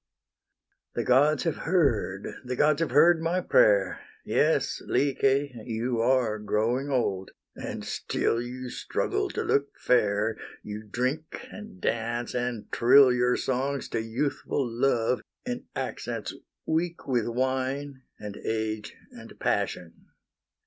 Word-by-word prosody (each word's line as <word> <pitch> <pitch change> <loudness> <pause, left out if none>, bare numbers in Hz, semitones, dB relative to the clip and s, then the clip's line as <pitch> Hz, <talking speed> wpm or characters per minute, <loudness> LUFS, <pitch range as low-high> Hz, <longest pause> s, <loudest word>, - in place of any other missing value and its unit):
The - - 0
gods 145 +4 +4
have 165 - -1
heard, 120 - +1 0.2
the 125 0 -3
gods 150 +3 +3
have 165 - +1
heard 160 +5 +5
my 170 +3 +1
prayer; - - +3 0.3
Yes, - - +1
Lyce! 140 0 +2
you 115 +1 -2
are 120 -3 +2
growing 110 +6 0
old, 100 -8 0 0.3
and - - -6
still 115 - -1
You 125 +1 -6
struggle - - -1
to - - -3
look 140 0 0
fair; 110 -2 +2 0.3
You 105 0 -6
drink, 130 +8 -2
and 210 -2 -10
dance, 115 -2 -1
and 120 -3 -3
trill 130 +2 +6
Your 125 0 +2
songs 135 +2 -1
to 115 - -1
youthful 130 +3 -2
Love, 120 0 +1 0.2
in 245 0 -4
accents - - -4 0.3
weak 165 +2 -1
With 120 -4 +1
wine, 130 +3 -2 0.2
and 105 -1 -7
age, 110 -1 -3 0.2
and - - -13
passion. 85 -1 -2
125 Hz, 125 wpm, -27 LUFS, 115-145 Hz, 0.3 s, trill